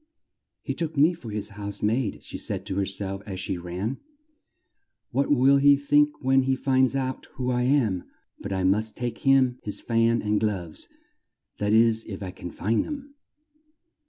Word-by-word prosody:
"He - - -2
took 160 -2 -4
me 155 +5 +5
for 145 -9 -10
his 105 0 -4
house 100 -1 -7
maid," 110 0 0
she - - -7
said 95 -2 -4
to 100 -2 -4
her 100 -1 +1
self 95 0 -4
as 95 -2 -5
she 95 -1 -3
ran. 90 +9 -4 1.1
"What 135 +3 +1
will 140 0 +5
he 140 +1 +6
think 145 +1 +2
when 135 +1 +4
he 130 0 +1
finds 130 -1 +2
out 130 -1 -3
who 125 -1 -1
I 125 0 +1
am! 120 -10 +2 0.3
But 100 - -6
I 95 -1 -1
must 105 +4 +1
take 120 -1 -3
him 130 -2 +3
his 105 - -5
fan 115 0 +1
and 105 0 +1
gloves 95 -7 -3 0.7
that 105 0 0
is 115 0 +4
if 100 -2 -7
I 95 - -5
can 90 -1 -8
find 110 +6 0
them." 285 -1 -7
115 Hz, 180 wpm, -26 LUFS, 100-135 Hz, 1.1 s, he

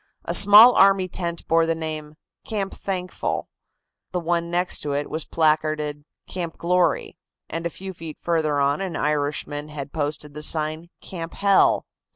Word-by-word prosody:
A - - -2
small 210 +5 +9
army 195 -1 +4
tent 170 -2 -4
bore 165 0 +3
the 165 - +1
name, 155 -1 -6 0.3
"Camp 200 -3 -3
Thankful," 185 -2 -4 0.6
the 180 - -1
one 170 0 -1
next 175 +1 0
to 145 - -3
it 145 +1 -3
was 160 0 -3
placarded 155 -2 0 0.2
"Camp 170 -3 -5
Glory" 180 +1 0 0.3
and 165 +1 -3
a - - -6
few 190 +3 -8
feet 165 -3 -9
farther 155 -4 0
on 140 +4 +1
an 185 -4 -4
Irishman 145 0 -2
had 145 -2 -7
posted 150 -1 -3
the 150 - -7
sign 155 +2 0
"Camp 165 -3 -7
Hell." 200 -1 +3
165 Hz, 160 wpm, -23 LUFS, 150-180 Hz, 0.6 s, small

